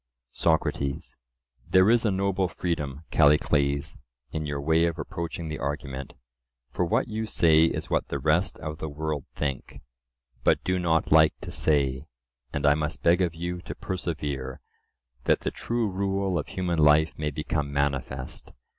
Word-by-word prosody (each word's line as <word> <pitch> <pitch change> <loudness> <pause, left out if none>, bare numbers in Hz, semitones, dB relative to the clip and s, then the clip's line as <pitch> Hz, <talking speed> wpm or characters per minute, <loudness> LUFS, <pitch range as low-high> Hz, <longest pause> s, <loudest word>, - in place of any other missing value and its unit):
SOCRATES: 70 -4 0 0.5
There 95 +3 +6
is 120 -1 +3
a - - +4
noble 95 -1 +1
freedom, 75 -4 -3
Callicles, 70 -2 +2 0.3
in 80 -1 -3
your 70 -1 -3
way 80 +3 +3
of 85 0 -3
approaching 85 +2 -5
the 75 - -5
argument; 70 -1 -4 0.6
for 90 - 0
what 85 - +1
you 110 0 -3
say 80 -5 +5
is - - -2
what - - +1
the - - -2
rest 80 +5 +1
of 75 -1 -5
the 80 - -4
world 75 -1 -3
think, 70 -4 -4 0.6
but - - +3
do 90 0 0
not 80 -2 +1
like 80 0 +6
to - - -7
say. 70 -2 +1 0.4
And 75 - -2
I 70 - +6
must 75 +1 -3
beg 85 +2 +4
of 85 -2 0
you 85 +1 -4
to - - -7
persevere, 75 -8 -4 0.7
that - - +3
the - - -2
true 120 -1 -1
rule 95 -1 -1
of 75 - -5
human 90 -3 -2
life 75 +1 +5
may 75 -1 -2
become 75 0 -2
manifest. 70 -2 -3
80 Hz, 160 wpm, -27 LUFS, 70-90 Hz, 0.7 s, There